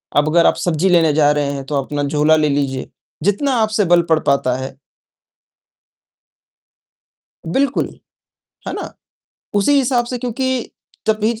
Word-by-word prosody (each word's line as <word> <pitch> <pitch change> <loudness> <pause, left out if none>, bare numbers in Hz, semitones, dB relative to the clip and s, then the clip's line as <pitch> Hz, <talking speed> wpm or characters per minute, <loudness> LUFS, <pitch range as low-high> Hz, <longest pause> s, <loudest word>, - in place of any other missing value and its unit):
अब 145 +1 +3
अगर 170 0 +4
आप - - +3
सब्ज़ी 175 +2 0
लेने 165 -4 +4
जा 150 -1 +4
रहे 145 -1 0
हैं 140 - -5
तो 145 - -4
अपना 145 +1 -3
झोला 150 +2 +3
ले 150 -1 +2
लीजिए, 140 -2 -2 0.3
जितना 255 +8 +1
आपसे 215 -1 +1
बल 175 0 +4
पड़ 160 - +4
पाता 140 -4 +1
है 130 0 -7 2.7
बिल्कुल। 270 +12 0 0.8
है - - -3
ना? - - -6 0.6
उसी 205 +7 +3
हिसाब 245 -2 +1
से 250 0 -4
क्योंकि 250 +1 -2 0.4
तो 220 - +5
फिर 225 +1 0
165 Hz, 145 wpm, -18 LUFS, 145-225 Hz, 2.7 s, तो